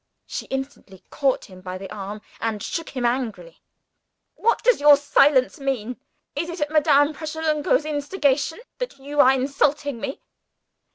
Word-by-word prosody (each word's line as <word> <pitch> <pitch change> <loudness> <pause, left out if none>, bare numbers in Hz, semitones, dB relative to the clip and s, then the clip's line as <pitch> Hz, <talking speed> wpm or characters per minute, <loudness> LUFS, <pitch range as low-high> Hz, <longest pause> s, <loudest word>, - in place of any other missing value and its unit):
She - - -6
instantly 270 -8 -6
caught 275 -3 0
him 185 -4 -14
by 185 0 -6
the 195 +2 -8
arm, 205 +1 -6 0.2
and 220 -3 -2
shook 330 -2 -4
him 245 - 0
angrily. 220 -9 -3 0.7
"What 465 +2 +1
does 485 -8 +3
your 295 -1 +8
silence 285 -2 +3
mean? 250 -4 -2 0.4
Is 330 +4 -2
it 345 +1 -6
at 295 0 -1
Madame 295 -1 +4
Pratolungo's 310 0 0
instigation 295 - 0 0.2
that - - -4
you 285 +2 -6
are 260 - +8
insulting 280 0 0
me?" 275 -1 -4
280 Hz, 150 wpm, -23 LUFS, 240-295 Hz, 0.7 s, your